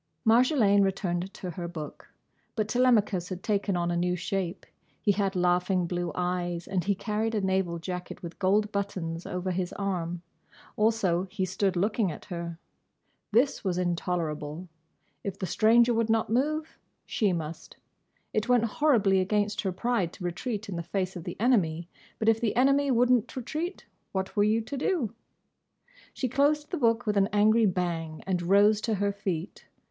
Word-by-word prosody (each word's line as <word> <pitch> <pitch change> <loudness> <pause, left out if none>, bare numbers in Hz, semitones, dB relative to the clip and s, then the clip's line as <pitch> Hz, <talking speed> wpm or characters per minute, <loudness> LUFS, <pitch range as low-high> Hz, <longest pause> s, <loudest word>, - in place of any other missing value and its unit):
Marjolaine 225 -3 +5
returned 190 -1 -1
to 180 - -5
her 170 +1 -5
book. 160 -3 -8 0.4
But 215 -2 0
Telemachus 215 -7 +2
had 185 -1 -6
taken 200 -3 0
on 175 0 0
a - - 0
new 180 +1 +1
shape. 180 0 -3 0.3
He 205 - +2
had 195 -1 0
laughing 180 +1 +2
blue 175 0 -2
eyes 175 -1 -2
and 185 -2 -1
he 200 +3 +1
carried 220 +3 -2
a 210 - +1
naval 190 -3 0
jacket 180 +2 -6
with 170 0 -8
gold 205 +2 +2
buttons 185 -5 -3
over 180 +1 -2
his 180 0 -2
arm. 175 -3 -3 0.5
Also 200 -5 +1
he 190 -1 -2
stood 190 0 0
looking 200 +1 +1
at - - -9
her. 170 -2 -5 0.7
This 245 +6 +2
was 185 -3 -1
intolerable. 170 -2 -2 0.6
If 195 -1 -4
the 190 - -3
stranger 235 +6 +4
would 230 -1 +1
not 220 -1 +1
move, 305 +6 0 0.3
she 210 -4 +1
must. 165 -2 -5 0.6
It 215 +3 -1
went 245 -2 +4
horribly 220 -6 +3
against 205 +2 0
her 195 - -1
pride 195 -3 -1
to - - -10
retreat 210 +5 -3
in 190 -4 -4
the - - -2
face 185 +2 -3
of 175 - -7
the - - -6
enemy, 175 -9 +2 0.3
but 220 - -2
if 225 0 +4
the 225 -3 0
enemy 275 +3 +3
would 250 0 +3
n't 245 -1 +2
retreat, 315 - -4 0.3
what 190 0 -3
were 205 - +4
you 215 +2 +2
to 255 +6 -6
do? 275 - 0 1.0
She 260 - -2
closed 290 +4 +1
the 355 - -1
book 230 0 +2
with 210 -1 0
an 195 +1 +3
angry 215 +2 +4
bang 170 -4 -2
and 185 -2 0
rose 205 +4 +4
to 225 -1 0
her 200 +1 0
feet. 185 -3 -4
195 Hz, 175 wpm, -28 LUFS, 180-225 Hz, 1.0 s, Marjolaine